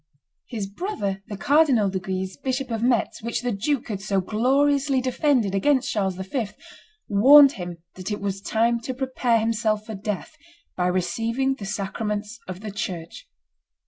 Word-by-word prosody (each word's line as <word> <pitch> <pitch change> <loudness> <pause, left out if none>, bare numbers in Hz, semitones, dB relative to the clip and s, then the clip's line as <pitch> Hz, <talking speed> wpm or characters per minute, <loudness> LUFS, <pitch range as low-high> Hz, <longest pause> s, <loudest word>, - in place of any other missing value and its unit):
His 220 -5 -4
brother, 200 - -3
the 205 - -6
Cardinal 275 -3 +4
de 190 - -1
Guise, 190 0 -4
Bishop 265 -1 -3
of 225 -1 -2
Metz, 240 -1 +1
which 235 +2 -3
the 245 - 0
duke 245 +5 -1
had 200 -3 -3
so 195 0 0
gloriously 270 +7 +2
defended 255 -4 +1
against 260 +7 +2
Charles 195 -3 0
V., 195 +5 -3 0.6
warned 270 +7 +8
him 175 -7 -6 0.2
that 185 +1 -6
it 205 - -2
was 195 -1 -3
time 230 +3 +1
to 255 +2 -5
prepare 255 -3 +1
himself 220 -1 0
for 220 - -6
death 210 - -4 0.4
by 180 -1 +1
receiving 225 +9 0
the 205 -7 -7
sacraments 210 +2 -3
of 185 +1 -7
the 215 -1 -5
church. 180 -5 -6
220 Hz, 160 wpm, -24 LUFS, 195-255 Hz, 0.6 s, warned